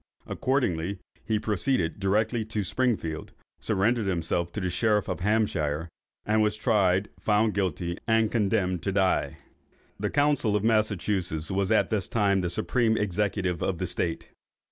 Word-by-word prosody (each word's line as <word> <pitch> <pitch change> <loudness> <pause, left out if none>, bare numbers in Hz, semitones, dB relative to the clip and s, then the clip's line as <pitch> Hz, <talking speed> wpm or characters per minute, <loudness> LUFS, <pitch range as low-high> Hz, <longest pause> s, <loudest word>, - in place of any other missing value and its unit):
Accordingly 100 -9 -1 0.3
he 110 - +1
proceeded 105 -4 -1
directly 105 +4 +1
to 110 -1 -2
Springfield, 100 -9 -1 0.3
surrendered 110 +2 +1
himself 85 -1 -1
to - - -3
the 90 -2 -2
sheriff 105 +1 +1
of - - -3
Hampshire, 85 -6 0 0.4
was 105 0 +2
tried, 100 -4 +2
found 105 0 +2
guilty, 90 -2 -2
and 110 -1 +3
condemned 95 -5 +1
to 95 - -1
die. 95 -1 +1 0.6
The 105 0 -1
council 145 -7 +2
of 105 - 0
Massachusets 105 -7 0
was 95 +2 0
at 110 - +3
this 105 -4 0
time 100 -4 +2
the 90 - -1
supreme 110 +5 +1
executive 100 -3 -1
of 95 - -1
the 90 - -2
State. 85 -1 -2
100 Hz, 145 wpm, -27 LUFS, 90-110 Hz, 0.6 s, and